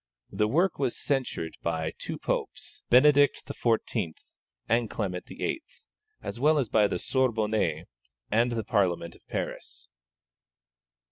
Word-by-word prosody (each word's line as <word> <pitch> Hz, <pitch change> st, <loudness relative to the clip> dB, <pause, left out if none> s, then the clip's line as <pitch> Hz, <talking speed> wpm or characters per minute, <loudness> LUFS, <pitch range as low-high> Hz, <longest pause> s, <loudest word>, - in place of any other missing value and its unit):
The 105 Hz, -, +1 dB
work 170 Hz, -, +2 dB
was 130 Hz, -4 st, 0 dB
censured 125 Hz, -, -2 dB
by 80 Hz, -1 st, -2 dB
two -, -, -4 dB
Popes, -, -, -3 dB
Benedict 145 Hz, +2 st, +5 dB
XIV. 110 Hz, -8 st, -1 dB, 0.5 s
and 115 Hz, 0 st, +2 dB
Clement 90 Hz, -4 st, -3 dB
XIII., 330 Hz, -, -3 dB, 0.6 s
as -, -, -5 dB
well 150 Hz, +3 st, +4 dB
as 130 Hz, -7 st, 0 dB
by 105 Hz, -2 st, +4 dB
the 90 Hz, -, -2 dB
Sorbonne 110 Hz, -, 0 dB, 0.5 s
and 115 Hz, +3 st, +3 dB
the 115 Hz, -2 st, -1 dB
Parliament 90 Hz, -6 st, 0 dB
of -, -, -20 dB
Paris. -, -, -5 dB
115 Hz, 125 wpm, -28 LUFS, 90-130 Hz, 0.6 s, Benedict